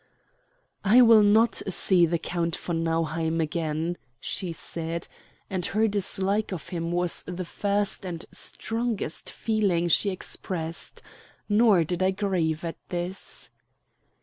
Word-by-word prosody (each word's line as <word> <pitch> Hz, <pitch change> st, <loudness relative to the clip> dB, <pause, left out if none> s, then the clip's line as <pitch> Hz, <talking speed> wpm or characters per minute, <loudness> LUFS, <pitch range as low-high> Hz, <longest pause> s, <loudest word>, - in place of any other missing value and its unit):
"I 225 Hz, +6 st, +7 dB
will 225 Hz, -2 st, +7 dB
not 210 Hz, +1 st, +4 dB
see 180 Hz, -2 st, +4 dB
the 170 Hz, +1 st, 0 dB
Count 170 Hz, 0 st, -2 dB
von 165 Hz, -2 st, -3 dB
Nauheim 165 Hz, 0 st, 0 dB
again," 160 Hz, +1 st, -2 dB, 0.2 s
she 185 Hz, -3 st, -2 dB
said, 165 Hz, 0 st, -4 dB, 0.4 s
and 185 Hz, -2 st, -3 dB
her 215 Hz, +5 st, +2 dB
dislike 200 Hz, 0 st, +1 dB
of 170 Hz, -7 st, -6 dB
him 170 Hz, -1 st, -3 dB
was 175 Hz, 0 st, 0 dB
the 180 Hz, +1 st, -4 dB
first 200 Hz, +3 st, 0 dB
and 175 Hz, -3 st, -5 dB
strongest 225 Hz, -7 st, -3 dB
feeling 200 Hz, -6 st, 0 dB
she 200 Hz, +5 st, +4 dB
expressed. 170 Hz, -3 st, -4 dB, 0.4 s
Nor 210 Hz, -4 st, +5 dB
did 175 Hz, +3 st, -2 dB
I 185 Hz, -, +4 dB
grieve 180 Hz, -5 st, -1 dB
at 165 Hz, -, -4 dB
this. 180 Hz, +1 st, -4 dB
180 Hz, 125 wpm, -26 LUFS, 165-200 Hz, 0.4 s, I